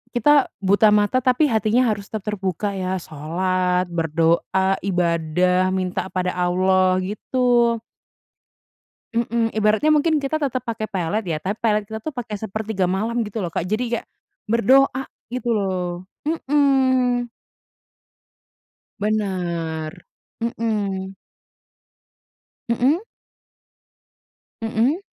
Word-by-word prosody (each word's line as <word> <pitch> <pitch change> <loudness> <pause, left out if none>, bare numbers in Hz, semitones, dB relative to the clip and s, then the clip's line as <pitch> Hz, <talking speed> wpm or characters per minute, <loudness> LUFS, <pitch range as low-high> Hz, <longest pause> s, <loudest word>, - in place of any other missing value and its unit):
kita 280 +4 +5 0.2
buta 205 +3 +5
mata, 210 +5 +3
tapi 255 +4 +3
hatinya 220 +3 +2
harus 200 -1 -4
tetap 215 -3 -5
terbuka 195 +1 -2
ya, 185 -1 -2
salat, 180 +4 0
berdoa, 170 +4 +1
ibadah, 180 0 +1
minta 185 0 -2
pada 180 -1 -1
Allah, 185 +1 +2
gitu. 235 +3 +1 1.4
Mhm, 230 0 0
ibaratnya 215 +8 +3
mungkin 310 +1 +3
kita 285 +2 -1
tetap 255 -3 -1
pakai 220 -2 -3
pelet 200 +2 -1
ya, 160 -2 -1
tapi 190 +7 -3
pelet 215 -2 +2
kita 220 +1 -6
tuh 310 - -5
pakai 235 -4 -4
sepertiga 215 -3 -2
malam 225 +6 0
gitu 215 0 -5
loh, 170 - -3
Kak. 175 - -2
Jadi 215 +5 0 0.2
kayak, - - -18 0.4
berdoa, 260 +4 +4 0.3
gitu 250 -1 -2
loh. 190 -3 0 0.4
Mhm. 265 -5 +2 1.7
Benar, 175 -7 -2 0.5
mhm. 205 -5 -2 1.5
Mhm. 265 +9 +2 1.6
Mhm. 230 - +1
210 Hz, 105 wpm, -22 LUFS, 185-240 Hz, 1.7 s, kita